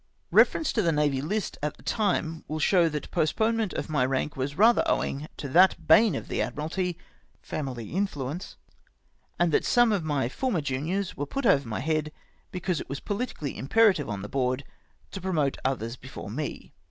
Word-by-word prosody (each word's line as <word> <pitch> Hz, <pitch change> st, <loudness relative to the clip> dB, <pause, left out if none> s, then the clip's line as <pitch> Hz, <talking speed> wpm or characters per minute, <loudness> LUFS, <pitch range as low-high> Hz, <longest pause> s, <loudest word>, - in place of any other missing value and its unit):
Eeference 320 Hz, -, +4 dB
to 220 Hz, -, +2 dB
the 170 Hz, -4 st, +2 dB
Navy 145 Hz, -3 st, +1 dB
List 200 Hz, +7 st, -3 dB
at 150 Hz, 0 st, -3 dB
the -, -, -18 dB
time 175 Hz, -7 st, -1 dB
will 155 Hz, -, -3 dB
show 170 Hz, +2 st, +4 dB
that 150 Hz, -1 st, -4 dB
the -, -, -11 dB
postponement 220 Hz, +5 st, +1 dB
of -, -, -3 dB
my 150 Hz, -5 st, +1 dB
rank 135 Hz, +3 st, -1 dB
was 140 Hz, +3 st, -3 dB
rather 230 Hz, +4 st, +6 dB
owing 145 Hz, +3 st, -1 dB
to 145 Hz, -, -5 dB
the 180 Hz, +7 st, +6 dB
bane 205 Hz, +5 st, +6 dB
of 110 Hz, -, -5 dB
the -, -, -1 dB
Admiralty 160 Hz, -, -2 dB, 0.2 s
— -, -, -38 dB
family 130 Hz, -7 st, -4 dB
influence, 170 Hz, -4 st, -3 dB, 0.8 s
and 175 Hz, -1 st, +2 dB
that -, -, +3 dB
some 240 Hz, -2 st, +4 dB
of 200 Hz, -5 st, 0 dB
my 145 Hz, -5 st, 0 dB
former 205 Hz, -, -1 dB
juniors 155 Hz, +8 st, -2 dB
were 145 Hz, -, -4 dB
put 275 Hz, -, -3 dB
over 140 Hz, -, +4 dB
my 110 Hz, +2 st, -3 dB
head 155 Hz, +1 st, -1 dB, 0.4 s
because 180 Hz, -2 st, -2 dB
it -, -, -10 dB
was 140 Hz, -, -4 dB
pohtically 205 Hz, -, -4 dB
im 135 Hz, -, -6 dB
perative 190 Hz, -, +4 dB
on 100 Hz, -1 st, -4 dB
the -, -, -5 dB
Board 130 Hz, +2 st, -1 dB, 0.5 s
to 195 Hz, -, -6 dB
promote 155 Hz, -7 st, 0 dB
others 125 Hz, -3 st, -1 dB
before -, -, -9 dB
me. -, -, -5 dB
155 Hz, 190 wpm, -27 LUFS, 135-190 Hz, 0.8 s, rather